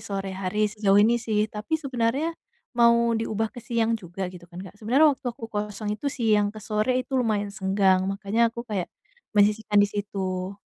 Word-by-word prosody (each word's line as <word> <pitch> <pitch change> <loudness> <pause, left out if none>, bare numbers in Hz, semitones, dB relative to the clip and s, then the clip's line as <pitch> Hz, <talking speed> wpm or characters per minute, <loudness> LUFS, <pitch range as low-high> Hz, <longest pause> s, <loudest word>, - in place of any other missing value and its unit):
sore 195 -1 -4
hari 195 +3 -1
sejauh 205 -2 +2
ini 230 +4 +4
sih. 215 -2 +1
Tapi 215 +10 -2
sebenernya 275 +2 -1 0.4
mau 235 -1 +4
diubah 225 -1 -1
ke 245 - -9
siang 230 -1 0
juga 190 -3 -4
gitu 175 -1 -13
kan, 175 - -14
Kak, 185 - -11
sebenernya 275 +8 +4
waktu 265 - -10
aku - - -8
kosong 210 0 -3
itu 210 +7 -3
siang 220 -6 +2
ke 210 - -10
sore 215 +4 0
itu 265 - -16
lumayan 210 -4 0
senggang, 190 -1 +2
makanya 205 +4 +1
aku 235 +1 -7
kayak 195 -5 -2 0.5
menyisihkan 210 +1 +3
di 205 - +4
situ. 195 -2 -4
210 Hz, 180 wpm, -25 LUFS, 200-235 Hz, 0.5 s, ini